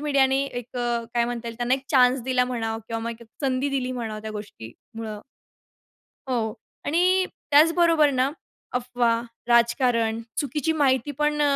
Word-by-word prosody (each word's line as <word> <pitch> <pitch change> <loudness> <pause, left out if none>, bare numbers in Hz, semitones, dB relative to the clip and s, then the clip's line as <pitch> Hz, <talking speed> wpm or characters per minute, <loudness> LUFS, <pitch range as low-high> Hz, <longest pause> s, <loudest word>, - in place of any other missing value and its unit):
मीडियाने 275 -2 +2
एक 245 -2 -7
अ, 240 -1 -1
काय 235 -1 +3
म्हणता 235 -1 -4
येईल, 230 - -7
त्यांना 240 +2 +2
एक 270 0 -6
चान्स 255 -2 +5
दिला 250 0 +2
म्हणा 225 -3 -2
किंवा 225 0 -3
मग 230 - -2
एक 235 - -13
संधी 270 0 0
दिली 255 -2 -1
म्हणावं, 220 -4 -4
त्या 220 - -5
गोष्टीमुळं. 210 - -8 1.1
हो 230 -4 -1 0.3
आणि 365 +5 +3 0.3
त्याचबरोबर 325 0 +5
ना 260 +2 +1 0.4
अफवा, 245 -2 +1 0.3
राजकारण, 235 -1 +3 0.2
चुकीची 295 +2 0
माहिती 280 -3 +2
पण, 300 0 +1
250 Hz, 145 wpm, -25 LUFS, 230-275 Hz, 1.1 s, चान्स